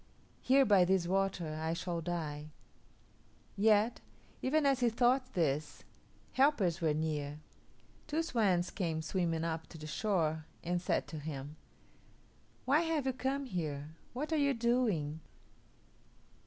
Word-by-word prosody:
Here 270 +1 +5
by 200 -4 +6
this 185 -1 +2
water 185 -4 -1
I 160 +1 0
shall 170 0 -3
die." 155 -3 -4 1.1
Yet, 215 +3 +3 0.4
even 300 +3 +2
as 275 -2 +3
he 245 -1 +3
thought 250 +2 +2
this, 155 -3 -1 0.5
helpers 215 - +3
were 155 -2 +2
near. 150 -2 -2 0.7
Two 310 +2 0
swans 195 - +1
came 165 -5 -2
swimming 165 -1 -1
up 160 -1 -3
to 165 - -11
the 155 - -8
shore 160 -3 0 0.2
and 175 +1 -1
said - - 0
to 155 - -6
him, 145 -1 -6 1.1
"Why 280 +5 +4
have 325 -4 0
you 265 - +1
come 270 +2 -2
here? 155 - -3 0.2
What 295 +6 -3
are - - +3
you 280 -2 +2
doing? 225 -11 +1
180 Hz, 135 wpm, -33 LUFS, 160-250 Hz, 1.1 s, by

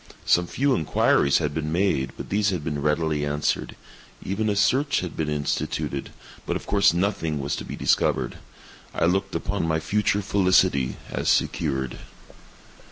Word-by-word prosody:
Some 90 0 +3
few 140 +6 +1
inquiries 70 - +3
had 75 -3 -1
been 75 0 -3
made, 80 -7 0
but - - -7
these 105 +1 +2
had 90 -6 -2
been 75 -3 -3
readily 75 0 0
answered. 75 0 -1 0.5
Even 105 +3 -1
a 105 - 0
search 135 +8 +2
had 90 -2 -6
been 80 -2 -2
instituted—but 75 -1 -4
of - - -5
course 100 -1 +4
nothing 85 -3 -1
was 70 +1 -2
to - - -5
be - - -6
discovered. - - +1 0.6
I - - +2
looked 95 +3 0
upon 100 -5 -2
my 80 -1 +1
future 105 +4 0
felicity 95 -9 +2 0.2
as - - -1
secured. 65 -5 0
85 Hz, 155 wpm, -24 LUFS, 75-100 Hz, 0.6 s, course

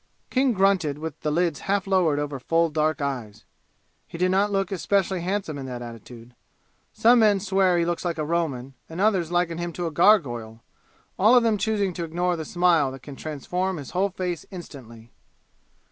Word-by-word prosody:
King 260 -1 +2
grunted 190 -7 +2
with 160 0 -6
the 150 - -2
lids 165 -1 0
half 200 -1 +1
lowered 185 -6 +2
over 145 -2 -3
full 165 +4 +1
dark 155 -1 0
eyes. 125 -7 -5 0.6
He - - -9
did 180 +1 +1
not 200 +2 +2
look 195 -1 -1
especially 190 -1 0
handsome 180 -5 -3
in 135 - -6
that 125 -1 -6
attitude. 115 +1 -11 0.6
Some 240 +2 +4
men 210 -3 +4
swear 190 -2 +2
he 170 - +2
looks 175 0 -2
like 175 -2 -2
a 155 - -2
Roman, 145 -6 -2 0.2
and 165 +2 -7
others 190 -5 +2
liken 175 -1 0
him 175 0 -3
to 175 - -4
a 165 - -2
gargoyle, 120 - +2 0.6
all 215 +6 +6
of 245 - +5
them 225 -2 +2
choosing 205 -2 0
to 170 - -4
ignore 175 +2 -1
the 160 -2 -5
smile 170 -6 +2
that 135 -1 -11
can 140 +1 -9
transform 180 +6 -3
his 140 -4 -8
whole 190 +2 +1
face 180 -3 -4
instantly. 120 - -11
170 Hz, 190 wpm, -24 LUFS, 145-190 Hz, 0.6 s, all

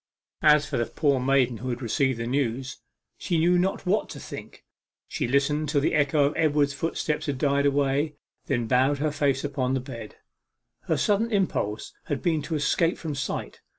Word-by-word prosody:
As 150 -1 +5
for - - -3
the 120 - 0
poor 140 -4 +1
maiden 130 -2 +2
who 130 +3 -5
had 120 -1 -3
received 130 +2 +1
the 115 - -2
news, 130 +1 -2 0.4
she 170 - -1
knew 175 +2 +4
not 190 +2 -1
what 200 +4 +1
to - - -8
think. - - -10 0.4
She - - -2
listened 140 +3 +1
till 145 -1 +2
the 140 - 0
echo 145 0 +3
of 145 - 0
Edward's 145 -2 +2
footsteps 155 +1 -2
had 140 -2 -1
died 140 +1 +2
away, 140 +2 +1 0.3
then 120 -1 0
bowed 130 +4 +2
her 150 +2 0
face 140 -2 0
upon 135 -2 -1
the - - 0
bed. 120 -4 -9 0.7
Her - - +1
sudden 215 +3 +1
impulse 175 - -1
had 145 - -3
been 165 -4 +1
to 155 +3 -3
escape 165 +3 +1
from 160 -3 -4
sight. 140 -1 -4
140 Hz, 185 wpm, -26 LUFS, 130-155 Hz, 0.7 s, As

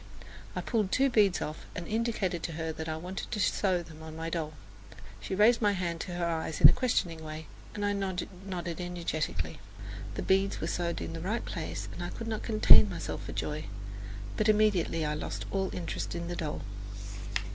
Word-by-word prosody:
I - - 0
pulled 215 -5 0
two 270 0 +4
beads 205 -6 +4
off 155 - -6
and 170 - -4
indicated 215 -6 0
to 165 - -3
her 160 0 -2
that 160 +1 -4
I 155 - -1
wanted 180 +4 -5
her - - -17
to 215 - -1
sew 185 -3 +2
them 160 -1 -12
on 160 0 -8
my 165 +1 -3
doll. 155 -2 -2 0.7
She 105 - -3
raised 225 +4 +6
my 205 -2 +4
hand 175 -3 -1
to 180 - -4
her 175 -1 0
eyes 160 -2 -1
in - - +12
a - - +6
questioning 175 -10 0
way, 155 0 -6 0.3
and 205 -1 -1
I 205 - +2
nodded 185 -2 -3
energetically. 160 - -2 0.6
The - - -2
beads 195 +1 +3
were - - -2
sewed 170 -1 -1
in - - -4
the 165 - -5
right 210 +7 -1
place - - -4
and - - -6
I - - -2
could 230 - -6
not 220 -1 -2
contain 215 -1 +7
myself 175 - -4
for - - -5
joy; 150 0 -2 0.7
but 215 0 +3
immediately 205 -7 +3
I 150 - 0
lost 150 - -4
all 190 -1 +1
interest 170 - -3
in 170 0 -3
the 175 - -2
doll. 155 -3 -3
175 Hz, 200 wpm, -31 LUFS, 160-205 Hz, 0.7 s, in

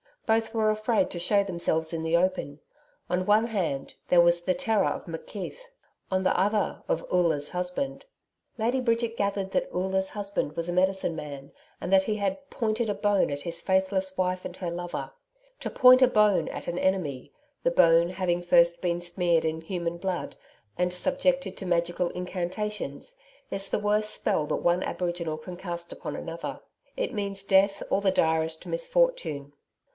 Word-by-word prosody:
Both 225 0 +1
were 215 -1 +3
afraid 215 +1 +1
to 175 - -4
show 200 +3 +3
themselves 170 -4 -1
in 160 -1 -2
the 160 +1 +1
open. 170 -5 0 0.5
On 180 +1 0
one 215 +3 +4
hand, 175 -11 -2
there 175 -1 +6
was 170 0 +4
the 185 +1 +1
terror 225 -2 +1
of - - -3
McKeith; - - -6 0.5
on 190 0 0
the - - +2
other, 205 +2 +1
of - - -1
Oola's 160 -5 +2
husband. 180 - -3 0.5
Lady 240 +4 +1
Bridget 230 -2 0
gathered 200 -1 -1
that 190 - 0
Oola's 190 +1 0
husband 200 -7 -3
was 170 +1 -2
a - - -1
medicine 185 -1 +1
man, 140 -2 -7 0.3
and - - -4
that 190 0 +6
he 215 +2 -1
had 205 +7 -3
'pointed 225 -1 -1
a - - +1
bone 205 -2 +2
at 145 0 -4
his 170 -1 -3
faithless 190 0 0
wife 185 0 0
and 180 - -6
her 175 -2 -3
lover.' 170 -6 -5 0.5
To - - -4
'point 255 0 +7
a 255 - +8
bone' 210 -5 +3
at - - -6
an 175 - -2
enemy 170 -9 -1 0.3
the - - +4
bone 170 - +5
having 180 -1 -1
first 170 -1 +4
been 175 -1 0
smeared 175 -1 +1
with 160 0 -2
human 170 -2 -3
blood, 180 -1 -3 0.4
and 180 0 +1
subjected 270 0 0
to - - -6
magical 175 0 0
incantations 190 - -4 0.3
is 195 0 -3
the - - 0
worst 210 +1 +1
spell 150 - 0
that - - 0
one 175 +1 +3
aboriginal 175 -4 -2
can 175 +3 -8
cast 170 -2 -6
upon - - -6
another. 165 0 -6 0.4
It - - -2
means 200 -2 -3
death 195 0 +3
or 200 - +2
the 195 -1 +3
direst 160 -2 +1
misfortune. - - 0
185 Hz, 175 wpm, -27 LUFS, 170-210 Hz, 0.5 s, a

